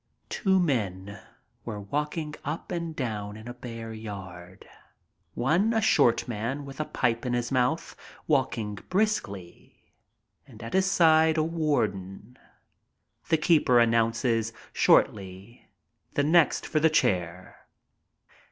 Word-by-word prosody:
Two 190 -2 +1
men 100 - -2 0.4
were 110 -3 -6
walking 150 +8 -3
up 155 +5 -5
and 170 -2 -4
down 105 -6 -4
in 110 +2 -11
a 120 - -6
bare 115 -2 -8
yard, 95 -5 -9 0.7
one 170 - +2
a - - +3
short 120 - +3
man 120 +5 -4
with 135 0 -10
a 155 - -1
pipe 115 -4 -1
in 125 -2 -2
his 120 0 -2
mouth, 130 +5 0 0.3
walking 125 -7 0 0.2
briskly, 145 - -3 0.5
and 115 -4 -13
at 115 - -7
his 190 0 +2
side 160 -3 +4
a 155 - +3
warden. 125 - -2 0.9
The 160 - +4
keeper 150 -6 +3
announces, 115 -1 +1 0.2
shortly, 100 +3 +1 0.5
"The 145 - +2
next 160 +1 +3
for 155 - 0
the 160 +1 +4
chair." 90 - -1
120 Hz, 125 wpm, -27 LUFS, 105-155 Hz, 0.9 s, side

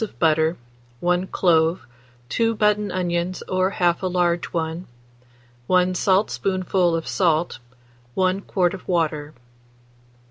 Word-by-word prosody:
of 220 - -6
butter, 160 0 +2 0.4
1 180 +1 0
clove, 165 -2 +2 0.4
2 230 0 +1
button 210 -1 +1
onions 175 0 -2
or 185 0 +1
1/2 175 -1 +1
a 190 - -1
large 175 -1 +1
one, 165 +1 -4 0.8
1 185 0 +3
saltspoonful 185 -2 +1
of 165 - -4
salt, 165 -5 +1 0.6
1 185 +1 +1
quart 180 -3 0
of 190 - -9
water. 155 -4 -1
180 Hz, 115 wpm, -22 LUFS, 170-185 Hz, 0.8 s, 1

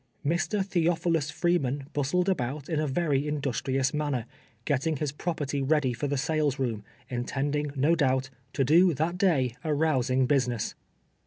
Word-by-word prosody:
Mr. 180 +6 0
Theophilus 170 -4 +1
Freeman 145 -4 0
bustled 150 +6 +1
about 140 -5 -1
in 160 -3 0
a 155 - 0
very 145 -1 +1
industrions 135 -2 -1
manner, 145 -6 -1 0.4
getting 150 +2 0
his 150 0 -2
property 145 -2 -3
ready 135 -2 +2
for 120 +5 -3
tiie 140 0 -1
sales 150 0 0
room, 115 -6 -2 0.2
intending, 140 +4 -2
no 145 +5 +3
doul)t, 135 -4 +1 0.2
to 135 - +1
do 165 +5 +5
that 170 +5 -1
day 135 - +2
a 155 -2 0
rousing 130 -4 +2
business. 125 -4 0
145 Hz, 150 wpm, -28 LUFS, 130-160 Hz, 0.4 s, do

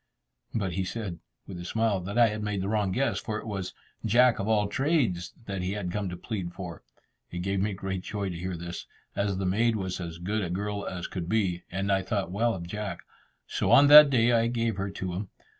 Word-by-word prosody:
But 95 -5 -1
he 95 +2 -1
said, 95 -3 -5 0.3
with 95 -3 -8
a - - -6
smile, 110 +1 +1
that 100 +5 -5
I 120 -2 +6
had 105 0 -4
made 105 -2 -2
a - - -2
wrong 105 -2 +1
guess, 135 +8 0
for 110 -3 -3
it - - -7
was 95 -4 -4 0.3
"Jack 120 +3 +4
of 100 - -2
all 105 -2 +3
Trades" 125 - 0
that 100 -3 -3
he 90 +2 -2
had 100 -4 -3
come 100 -1 -2
to 90 - -6
plead 90 -3 -4
for. 90 -3 -7 0.5
It 90 0 -5
gave 95 +1 0
me 100 +1 0
great 95 -1 -4
joy 100 0 -3
to 90 - -5
hear 90 +1 -4
this, 85 +1 -7 0.3
as 100 -1 0
the 95 - -2
maid 110 +5 +2
was 95 -3 -3
as 85 -1 -6
good 100 +5 -2
a 90 - -3
girl 100 +3 -3
as 90 -2 -4
could 90 -3 -5
be, 95 -5 +1
and 95 +2 -1
I 95 0 +3
thought 95 -1 -2
well 115 +4 +1
of 85 -2 -6
Jack; 100 0 -5 0.4
so - - -1
on 140 - +8
that 150 0 +11
day 120 -3 +4
I 115 -1 +3
gave 115 -3 -1
her 95 0 -2
to 95 -2 -4
him. 95 +2 -4
100 Hz, 235 wpm, -28 LUFS, 90-110 Hz, 0.5 s, that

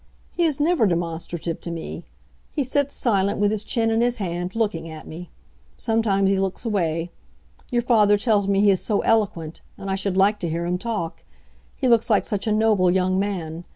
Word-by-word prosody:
"He 345 - +1
is 300 -3 0
never 310 -7 +3
demonstrative 170 -1 -3
to - - -6
me. 165 -1 -6 0.4
He 290 - -1
sits 280 +2 -1
silent, 200 -4 +1
with 205 0 +2
his 215 -1 -2
chin 225 0 0
in 225 +1 +2
his 240 0 +2
hand, 180 -2 -4
looking 190 -8 -1
at 155 -1 -9
me. 175 +2 -9 0.5
Sometimes 205 -4 +1
he 195 - +1
looks 195 +4 -2
away. 170 -6 -1 0.6
Your 240 -2 0
father 210 -4 +4
tells 205 -2 +1
me 200 0 +2
he 205 -1 +5
is 190 - +1
so 210 -3 +1
eloquent; 185 -8 0 0.2
and 195 - -5
I - - +1
should 195 -1 -2
like 205 +2 +3
to 170 - -2
hear 170 +2 -2
him 180 +1 -1
talk. 210 -7 -4 0.5
He 260 - -1
looks 235 -1 +3
like 210 - +3
such 205 +1 -3
a - - +2
noble 215 -4 +3
young 185 +1 +2
man. 175 -5 -3
200 Hz, 200 wpm, -23 LUFS, 175-225 Hz, 0.6 s, he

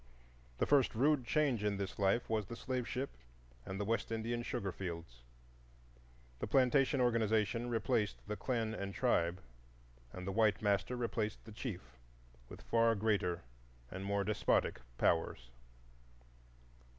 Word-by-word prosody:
The - - +2
first 140 -5 +3
rude 140 +2 +3
change 135 -7 +2
in 105 -1 +1
this 100 0 -4
life 100 +4 +2
was 110 -3 -1
the 115 - -6
slave 125 0 -3
ship 135 +2 -3 0.6
and 95 +1 -4
the 105 - -1
West 115 +2 -1
Indian 115 +1 -1
sugar 100 -4 -3
fields. 85 -10 -6 1.2
The - - -3
plantation 135 +1 +3
organization 115 -1 +2
replaced 110 -2 0
the 105 - -2
clan 110 +1 -1
and 100 -2 -4
tribe, 90 -8 +2 0.7
and 90 0 -7
the 95 - -2
white 110 0 +3
master 100 +3 +1
replaced 115 -3 -2
the 110 - -10
chief 90 - -7 0.5
with - - -10
far 115 0 +3
greater 100 -5 0 0.5
and 95 +1 -5
more 100 0 0
despotic 105 +1 +1 0.2
powers. 65 -7 +1
110 Hz, 140 wpm, -35 LUFS, 100-120 Hz, 1.2 s, first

